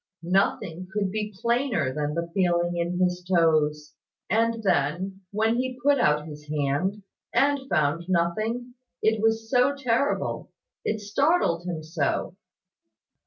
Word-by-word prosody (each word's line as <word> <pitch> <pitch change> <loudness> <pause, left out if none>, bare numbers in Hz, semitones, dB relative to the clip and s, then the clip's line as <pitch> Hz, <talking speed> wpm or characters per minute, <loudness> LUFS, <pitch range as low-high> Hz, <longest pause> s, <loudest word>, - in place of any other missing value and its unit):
Nothing 180 -1 0
could 200 -2 -1
be 210 0 -3
plainer 235 - +1
than 150 +1 -2
the 170 0 -3
feeling 175 -2 +1
in 170 +1 -1
his 180 0 +1
toes: 155 -4 +2 0.4
and, 230 0 +1
then, 185 +2 0
when 220 +3 +1
he 255 0 -2
put 280 +2 +3
out 150 -6 +2
his 150 -1 -10
hand, 150 +8 -1 0.3
and 275 +2 +2
found 155 +4 +1
nothing, 215 +8 0 0.3
it 220 -1 +2
was 225 0 +1
so 255 +3 +3
terrible 265 0 0 0.3
it 215 0 -1
startled 210 - +1
him 165 -3 -4
so. 155 +2 -2
190 Hz, 130 wpm, -26 LUFS, 165-230 Hz, 0.4 s, put